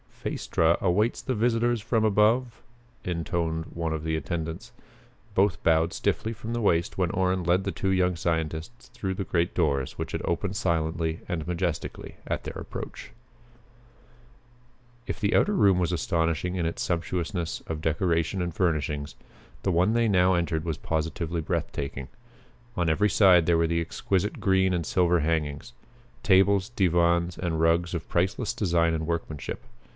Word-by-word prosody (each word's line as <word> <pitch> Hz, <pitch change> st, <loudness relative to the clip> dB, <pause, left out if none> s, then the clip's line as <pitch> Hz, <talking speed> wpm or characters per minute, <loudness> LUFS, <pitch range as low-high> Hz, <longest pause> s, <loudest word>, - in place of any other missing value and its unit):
"Phaestra 80 Hz, +1 st, +1 dB
awaits 100 Hz, +5 st, +2 dB
the 130 Hz, -, -2 dB
visitors 120 Hz, 0 st, +1 dB
from 110 Hz, +1 st, +1 dB
above," 115 Hz, +3 st, +2 dB, 0.4 s
intoned 85 Hz, -2 st, -2 dB
one 85 Hz, -1 st, -2 dB
of 80 Hz, -1 st, -3 dB
the 80 Hz, 0 st, -1 dB
attendants. 80 Hz, 0 st, -4 dB, 0.6 s
Both 95 Hz, -3 st, +2 dB
bowed 80 Hz, 0 st, +3 dB
stiffly 110 Hz, -, -1 dB
from 115 Hz, +1 st, -6 dB
the 120 Hz, -, -1 dB
waist 85 Hz, -5 st, +1 dB
when 90 Hz, -2 st, 0 dB
Orrin 95 Hz, 0 st, 0 dB
led 90 Hz, +3 st, +2 dB
the 100 Hz, -, -2 dB
two 95 Hz, -, -2 dB
young 90 Hz, -1 st, +2 dB
scientists 80 Hz, +6 st, -3 dB
through 95 Hz, -1 st, -4 dB
the 100 Hz, -, -2 dB
great 85 Hz, -1 st, 0 dB
doors 70 Hz, -6 st, +1 dB
which -, -, -4 dB
had -, -, -3 dB
opened 95 Hz, +3 st, -1 dB
silently 80 Hz, -4 st, -1 dB
and 80 Hz, -3 st, -3 dB
majestically 90 Hz, -2 st, -3 dB
at -, -, -2 dB
their -, -, -6 dB
approach. -, -, -8 dB, 2.0 s
If -, -, -4 dB
the 105 Hz, -1 st, +1 dB
outer 210 Hz, -, +3 dB
room 95 Hz, -, +4 dB
was 90 Hz, -1 st, 0 dB
astonishing 85 Hz, +1 st, 0 dB
in 85 Hz, -3 st, 0 dB
its 85 Hz, -, -3 dB
sumptuousness 85 Hz, 0 st, -2 dB
of 80 Hz, -1 st, -4 dB
decoration 85 Hz, +2 st, 0 dB
and 85 Hz, -1 st, -3 dB
furnishing, 75 Hz, -5 st, 0 dB, 0.6 s
the -, -, +1 dB
one 90 Hz, +5 st, +3 dB
they 115 Hz, 0 st, +2 dB
now 95 Hz, -2 st, +4 dB
entered 85 Hz, -2 st, -1 dB
was 80 Hz, -3 st, -2 dB
positively 80 Hz, +1 st, -2 dB
breath -, -, -2 dB
taking. 70 Hz, -2 st, -5 dB, 0.7 s
On 85 Hz, -2 st, +1 dB
every 105 Hz, +7 st, +2 dB
side 90 Hz, -6 st, +5 dB
there 85 Hz, -1 st, +4 dB
were 85 Hz, 0 st, +2 dB
the 85 Hz, 0 st, 0 dB
exquisite 95 Hz, +4 st, -1 dB
green 95 Hz, -2 st, +3 dB
and 85 Hz, -3 st, -1 dB
silver 90 Hz, -1 st, +2 dB
hangings. 75 Hz, -5 st, -2 dB, 0.5 s
Tables, 95 Hz, +2 st, +4 dB
divans, 85 Hz, -5 st, +2 dB
and 85 Hz, -3 st, -1 dB
rugs 85 Hz, +2 st, +2 dB
of 80 Hz, -, -5 dB
priceless 95 Hz, +6 st, 0 dB
design 85 Hz, -4 st, +1 dB
and 80 Hz, -1 st, -2 dB
workmanship. 80 Hz, -4 st, -4 dB
85 Hz, 160 wpm, -27 LUFS, 80-95 Hz, 2.0 s, side